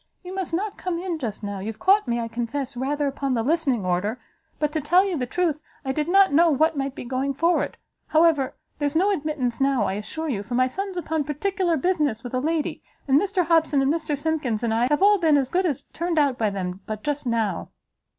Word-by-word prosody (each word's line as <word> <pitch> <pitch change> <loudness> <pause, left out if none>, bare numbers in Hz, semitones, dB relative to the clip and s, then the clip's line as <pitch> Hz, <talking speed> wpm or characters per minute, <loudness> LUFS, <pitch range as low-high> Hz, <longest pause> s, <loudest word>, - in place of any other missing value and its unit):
you 365 +1 -7
must 380 -3 -3
not 400 +5 -2
come 360 -2 -2
in 345 -2 -3
just 225 -6 -5
now; 200 -1 -4
you've 215 +3 -5
caught 395 -3 +3
me, 235 0 0
I 230 - -2
confess, 240 +4 -4
rather 285 +4 -1
upon 275 -1 -1
the 225 - 0
listening 275 - +1
order; 190 +7 -1 0.4
but 300 -1 0
to 310 0 -1
tell 355 +7 +4
you 380 -3 -1
the 250 -5 -2
truth, 325 -1 0 0.2
I 265 - 0
did 300 +3 -1
not 390 -2 +5
know 335 +3 +6
what 315 +2 +2
might 275 -1 -2
be - - -6
going 265 +2 -1
forward. 335 +5 +1 0.3
However, 315 -4 +3 0.2
there's 290 0 -1
no 385 +5 +3
admittance 295 - -2
now, 270 -4 +3
I 190 - -1
assure 215 +11 -5
you, 230 -9 -1
for 225 +4 -5
my 255 +1 +4
son's 385 +8 -4
upon 320 -3 -1
particular 345 +3 0
business 300 -8 0
with 245 - -7
a 255 - +1
lady, 315 +2 -1 0.3
and 275 +2 +5
Mr 380 -3 0
Hobson 320 -3 +3
and 270 +2 +2
Mr 315 -3 -2
Simkins 285 -7 -1
and 225 -2 +1
I, 235 +2 +2
have 295 +5 +2
all 410 0 +6
been 315 -4 +4
as 265 -2 0
good 365 +1 +2
as 285 -3 -2
turned 340 0 -2
out 285 -4 +3
by 220 -3 +1
them 185 -2 -4
but 215 -1 -5
just 290 -2 -2
now." 220 -6 -1
290 Hz, 230 wpm, -24 LUFS, 245-330 Hz, 0.4 s, know